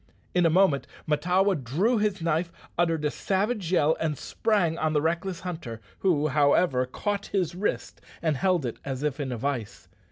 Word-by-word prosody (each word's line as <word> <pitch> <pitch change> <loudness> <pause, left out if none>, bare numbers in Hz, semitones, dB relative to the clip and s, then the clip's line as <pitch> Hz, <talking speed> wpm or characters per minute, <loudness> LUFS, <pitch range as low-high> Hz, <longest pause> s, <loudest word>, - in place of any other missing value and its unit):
In 180 -1 +4
a - - +3
moment 160 -4 +3 0.2
Mahtawa 180 +6 +2
drew 195 - +1
his 205 -4 0
knife, 165 +1 0 0.2
uttered 165 -3 +1
a 150 - +1
savage 200 0 -1
yell, 160 -3 +3
and 155 -3 -1
sprang 190 - 0
on 155 0 +1
the 150 - +3
reckless 170 +4 -1
hunter, 160 -11 -6 0.2
who, 155 -5 +2
however, 140 -3 +3
caught 205 +9 -3
his 185 -4 -1
wrist, 190 +4 -3 0.2
and 160 -3 0
held 180 0 +1
it 120 - -4
as 135 0 -4
if 150 -1 -1
in 135 -3 -2
a 120 - -3
vice. 120 -4 -4
165 Hz, 180 wpm, -27 LUFS, 145-190 Hz, 0.2 s, In